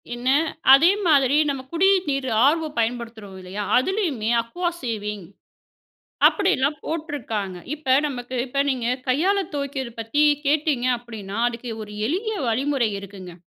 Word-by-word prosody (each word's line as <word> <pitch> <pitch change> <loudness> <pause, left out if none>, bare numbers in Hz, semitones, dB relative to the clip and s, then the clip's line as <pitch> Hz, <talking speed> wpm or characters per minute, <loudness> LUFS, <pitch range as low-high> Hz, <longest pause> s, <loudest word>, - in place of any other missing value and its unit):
என்ன, 240 +2 -2 0.4
அதே 320 +7 +7 0.2
மாதிரி 280 -3 +4
நம்ம 275 -2 -2
குடிய 380 +4 +4
நீரு 275 -2 -1 0.2
ஆர்வோ 315 +3 +2
பயன்படுத்துறோம், 225 -4 -3
இல்லையா? 185 +3 -5
அதுலயுமே 280 - 0
அக்வா 345 +10 -2
சேவிங் 210 -5 -4 1.0
அப்டின்னுலாம் 305 -8 +1
போட்டுருக்காங்க. 265 - -4 0.2
இப்ப 270 -4 +1
நமக்கு, 255 -3 -5
இப்ப 270 +2 -3
நீங்க 250 -3 -1 0.2
கையால 350 +11 +2
துவைக்கிறது 275 -4 -4
பத்தி 225 +6 0 0.2
கேட்டீங்க, 290 -3 +1
அப்டின்னா 220 -4 -8
அதுக்கு 240 0 -5
ஒரு 210 0 -11
எளிய 405 - -2
வழிமுறை 255 0 +1
இருக்குங்க. 190 -2 -10
260 Hz, 125 wpm, -23 LUFS, 225-295 Hz, 1.0 s, அதே